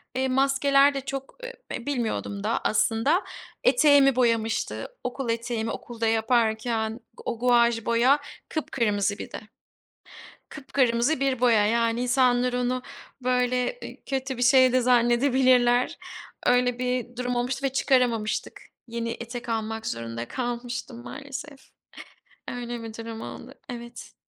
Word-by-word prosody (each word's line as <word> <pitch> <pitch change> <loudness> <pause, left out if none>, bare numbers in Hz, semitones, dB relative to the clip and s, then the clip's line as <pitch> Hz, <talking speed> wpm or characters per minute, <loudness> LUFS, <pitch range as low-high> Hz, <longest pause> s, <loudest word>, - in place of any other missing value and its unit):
eee, 260 +1 +1
maskeler 275 +1 +3
de 275 - -3
çok, 270 - -6
ııı, - - -6 0.3
e 235 - -12
bilmiyordum 230 -6 -2
da 220 +2 0
aslında. 230 - +2 0.4
Eteğimi 285 - +5
boyamıştı. 230 -3 0 0.2
Okul 250 0 -4
eteğimi 230 -1 -2
okulda 230 -2 -4
yaparken 225 0 +1 0.3
o 230 - -3
guaj 235 -2 +3
boya 245 +5 +4 0.3
kıpkırmızı 210 -9 -1
bir - - -8
de. - - -5 1.1
Kıpkırmızı 265 -1 0
bir 265 -3 0
boya. 230 -4 +4
Yani, 230 +2 +1
insanlar 250 0 +2
onu, 250 +1 -1 0.4
böyle, 250 - 0
eee, - - -9
kötü 265 -1 -2
bir 245 - -4
şey 260 0 +6
de 255 - +4
zannedebilirler. 245 0 +3 0.5
Öyle 245 0 +3
bir 250 -1 -2
durum 250 0 -2
olmuştu 250 +2 -2
ve 265 - -2
çıkaramamıştık. 245 -5 0 0.3
Yeni 230 0 -3
etek 235 +1 -7
almak 220 0 -3
zorunda 115 0 -4
kalmıştım, 240 0 -4
maalesef. 275 +1 -9 0.8
Öyle 240 -1 -5
bir 225 -1 -7
durum 225 0 -7
oldu. 255 +3 -9 0.2
Evet. 235 -1 -8
245 Hz, 125 wpm, -26 LUFS, 230-260 Hz, 1.1 s, şey